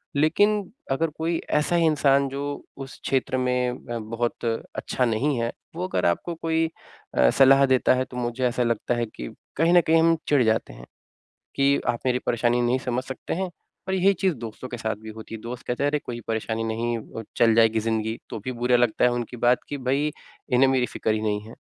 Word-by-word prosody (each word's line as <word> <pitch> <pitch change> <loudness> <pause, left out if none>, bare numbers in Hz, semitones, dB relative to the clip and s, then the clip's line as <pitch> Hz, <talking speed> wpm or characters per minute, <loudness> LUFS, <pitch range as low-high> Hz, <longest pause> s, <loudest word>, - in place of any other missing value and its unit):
लेकिन 195 +7 +2 0.2
अगर 160 +5 +1
कोई 165 +1 0 0.2
ऐसा 175 - 0
इंसान 140 -4 +3
जो 140 +1 -4 0.3
उस 135 0 -9
क्षेत्र 130 -1 0
में 125 0 +1
अ, 120 -1 -6
बहुत 115 +2 -3 0.3
अच्छा 125 - -1
नहीं 120 +5 0
है 115 0 -1 0.2
वो 180 +2 -2
अगर - - -1
आपको 125 - 0
कोई 165 0 0 0.5
अ, 65 - +6
सलाह 135 - +6
देता 130 -1 +3
है 130 0 0
तो 125 - -10
मुझे 120 +1 -1
ऐसा 125 0 0
लगता 115 +1 0
है 120 0 0
कि - - -6 0.3
कहीं 165 +3 +3
न 175 - +7
कहीं 165 0 +3
हम 165 0 +4
चिढ़ 140 -4 +4
जाते 110 0 0
हैं, - - -12 0.7
कि 140 0 +3
आप 120 - +1
मेरी 125 -1 +2
परेशानी 120 +1 +1
नहीं 120 +2 +2
समझ 125 0 -2
सकते 130 0 -5
हैं 190 +2 -1 0.4
और 190 - -1
यही 190 +1 +4
चीज़ 190 0 +1
दोस्तों 115 +3 -7
के 120 - -5
साथ 110 -1 -2
भी 110 - -9
होती 110 +1 -8
है। - - -8
दोस्त 120 +2 -7
कहते 125 +3 -1
हैं, 145 - +3
"अरे, 150 - +1
कोई 120 -3 -6
परेशानी 110 0 -2
नहीं 115 +1 -1
अ, 115 +1 -8
चल 115 -1 +5
जाएगी 115 -1 +4
ज़िंदगी," 110 0 -1
तो - - -4
भी 130 - -2
बुरा 125 0 +3
लगता 120 0 +2
है 125 - +4
उनकी 120 0 -4
बात 120 +1 +3
कि 145 - -3
भई 140 +3 +2 0.5
इन्हें 130 +2 +5
मेरी 130 -2 +2
फ़िक्र 110 - -2
ही 110 - -1
नहीं 105 -1 -1
है 115 - -11
125 Hz, 215 wpm, -25 LUFS, 115-145 Hz, 0.7 s, न